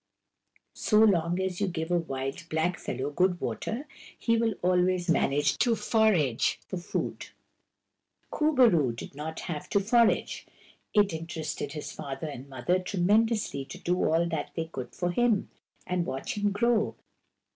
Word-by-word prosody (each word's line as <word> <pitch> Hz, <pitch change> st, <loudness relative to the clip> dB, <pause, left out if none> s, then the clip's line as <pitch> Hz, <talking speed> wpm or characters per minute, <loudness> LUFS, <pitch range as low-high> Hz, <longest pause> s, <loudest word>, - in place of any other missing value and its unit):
So 215 Hz, -, +1 dB
long 175 Hz, -5 st, +4 dB
as 190 Hz, 0 st, -2 dB
you 200 Hz, -, +2 dB
give 165 Hz, -1 st, -3 dB
a 175 Hz, -, +3 dB
wild 135 Hz, +2 st, -5 dB
blackfellow 160 Hz, -4 st, -2 dB
good 180 Hz, +2 st, +2 dB
water 255 Hz, +7 st, -3 dB, 0.3 s
he 230 Hz, -, +1 dB
will 225 Hz, -1 st, +1 dB
always 180 Hz, 0 st, +2 dB
manage 145 Hz, -1 st, +2 dB
to 240 Hz, -2 st, +3 dB
forage 200 Hz, -, +2 dB
for 185 Hz, -, -5 dB
food. 175 Hz, -, -4 dB, 1.0 s
Kur 305 Hz, 0 st, +2 dB
bo 260 Hz, -3 st, +7 dB
roo 150 Hz, -, +3 dB
did 115 Hz, -, -8 dB
not 155 Hz, +3 st, -6 dB
have 155 Hz, -4 st, -5 dB
to 200 Hz, -, +3 dB
forage. 230 Hz, +3 st, +2 dB, 0.5 s
It 205 Hz, -4 st, +4 dB
inter 160 Hz, 0 st, -5 dB
ested 155 Hz, -2 st, -4 dB
his 150 Hz, -, -6 dB
father 135 Hz, +2 st, -6 dB
and 140 Hz, -3 st, -7 dB
mother 135 Hz, +8 st, 0 dB
tremendously 200 Hz, -2 st, +1 dB
to -, -, -9 dB
do 180 Hz, -, 0 dB
all 165 Hz, +2 st, +2 dB
that 160 Hz, -4 st, -3 dB
they 165 Hz, -, -1 dB
could 130 Hz, -6 st, -7 dB
for 175 Hz, -1 st, -1 dB
him, 225 Hz, +1 st, +1 dB, 0.3 s
and 180 Hz, -1 st, 0 dB
watch 135 Hz, -5 st, -4 dB
him 205 Hz, 0 st, +1 dB
grow. 225 Hz, +2 st, +1 dB
175 Hz, 155 wpm, -28 LUFS, 155-205 Hz, 1.0 s, bo